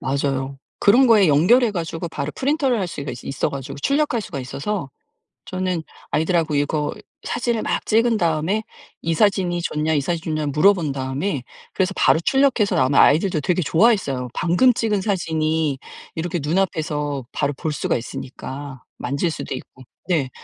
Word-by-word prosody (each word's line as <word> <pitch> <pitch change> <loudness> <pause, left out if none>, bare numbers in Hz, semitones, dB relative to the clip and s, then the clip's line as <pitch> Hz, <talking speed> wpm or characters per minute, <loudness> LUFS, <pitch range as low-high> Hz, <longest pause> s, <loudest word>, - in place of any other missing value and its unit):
맞아요. 135 0 -2 0.2
그런 245 +6 +6
거에 210 -7 +6
연결해 215 - +5
가지고 170 -2 -4
바로 150 -2 -4
프린터를 270 -3 +1
할 190 - -1
수가 145 -4 -5
있어 135 - -1
가지고 140 +1 -6
출력할 290 -3 +1
수가 180 -8 -6
있어서 140 +4 -4 0.6
저는 185 -3 -2 0.3
아이들 160 +4 +1
하고 160 -3 +1
이거 145 +1 0 0.3
사진을 240 -2 -1
막 - - -1
찍은 230 +1 +3
다음에 170 +5 0 0.4
"이 165 - 0
사진이 180 -1 +2
좋냐? 155 0 -1
이 145 - +2
사진이 160 +1 -2
좋냐?" 150 -1 -1
물어본 160 +1 +3
다음에 135 +3 -2 0.3
그래서 190 0 0
바로 - - +4
출력해서 260 +1 +2
나오면 130 +2 +3
아이들도 160 +3 +4
되게 180 +4 +1
좋아했어요. 160 - +2
방금 180 +9 +3
찍은 215 -3 0
사진이 160 -7 0 0.4
이렇게 175 +1 -2
눈앞에서 150 -5 -1
바로 145 0 -1
볼 155 +3 -3
수가 140 - 0
있으니까 130 +2 -7
만질 150 +4 -1
수도 135 - -5
있고 130 0 -11 0.3
네 145 -7 +1
160 Hz, 365 characters per minute, -21 LUFS, 145-200 Hz, 0.6 s, 그런